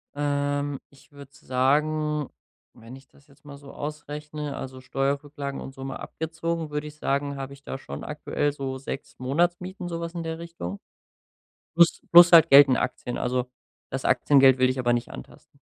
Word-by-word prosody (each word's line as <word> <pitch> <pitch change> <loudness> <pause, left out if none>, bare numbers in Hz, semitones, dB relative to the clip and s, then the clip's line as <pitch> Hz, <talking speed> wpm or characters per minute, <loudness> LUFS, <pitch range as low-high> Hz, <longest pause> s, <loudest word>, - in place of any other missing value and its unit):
Ähm, 145 -1 -1
ich 140 +1 -22
würde 140 -1 -13
sagen 150 +3 0 0.5
wenn 115 +3 -11
ich 135 0 -16
das 140 - -24
jetzt 140 -2 -24
mal 145 -1 -11
so 140 0 -13
ausrechne, 150 0 -6
also 130 -1 -7
Steuerrücklagen 140 +1 -3
und 135 - -8
so 135 - -9
mal 135 0 -5
abgezogen, 165 0 -4
würde 150 0 -3
ich 150 0 -9
sagen, 140 -1 -1
hab 135 -1 -6
ich 140 0 -14
da 135 - -6
schon - - -8
aktuell 145 0 -2
so 135 -2 -4
6 135 +1 -7
Monatsmieten, 175 +7 -1
so 170 -1 -4
was 170 0 -5
in 170 - -4
der 160 0 -4
Richtung. 165 - -7 1.0
Plus 170 0 +4
plus 175 0 +10
halt 165 -3 +7
Geld 140 +1 +9
in 130 - +3
Aktien, 125 - -3
also 125 0 -2 0.4
das 135 0 -5
Aktiengeld 135 0 +5
will 130 0 +4
ich 130 +1 -2
aber 120 -1 +1
nicht 120 0 -2
antasten. 60 - -13
145 Hz, 180 wpm, -25 LUFS, 135-150 Hz, 1.0 s, plus